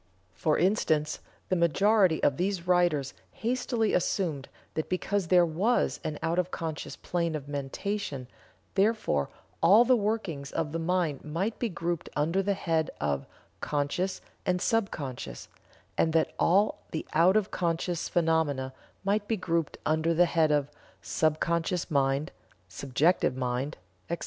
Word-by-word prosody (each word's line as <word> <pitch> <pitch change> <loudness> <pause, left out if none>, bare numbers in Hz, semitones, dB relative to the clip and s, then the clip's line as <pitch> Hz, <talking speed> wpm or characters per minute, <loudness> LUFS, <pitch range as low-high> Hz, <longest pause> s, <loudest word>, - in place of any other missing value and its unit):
For - - +1
instance, 160 -5 +1 0.3
the 185 - +2
majority 185 +1 +3
of 140 - +3
these 185 -1 -1
writers 175 -7 +2 0.2
hastily 235 -1 0
assumed 165 -6 0 0.2
that 155 - -3
because 190 0 -1
there 180 0 +5
was 190 +10 +1
an 150 -1 -3
out 165 +2 +1
of 180 0 0
conscious 160 -4 -5
plane 170 -2 -2
of 145 -2 -5
mentation, 145 0 -3 0.5
therefore 195 - +1 0.3
all 215 +7 +7
the 255 +1 +5
workings 200 - -2
of 155 -2 -2
the 165 - -2
mind 165 -4 0
might 180 +9 -2
be 240 - 0
grouped 170 -2 -3
under 165 +6 +1
the 200 +1 0
head 165 -4 0
of 70 -2 -1 0.3
"conscious" 150 +6 -1 0.2
and 180 -2 +1
"sub 225 +1 +1
conscious," 130 - -6 0.5
and 160 - +3
that 160 -1 +2
all 200 +5 +3
the 155 - -4
out 180 +6 +5
of 210 -2 0
conscious 170 0 -1
phenomena 160 -6 +1 0.3
might 205 +1 0
be 225 - 0
grouped 165 -4 -1
under 160 +2 +2
the 175 +2 +6
head 165 -3 +2
of 145 -1 +1 0.3
"subconscious 170 +3 0
mind," 140 +2 +1 0.4
"subjective 140 - +1
mind," 130 +4 -2 0.3
etc. 170 0 -2
170 Hz, 145 wpm, -28 LUFS, 150-190 Hz, 0.5 s, all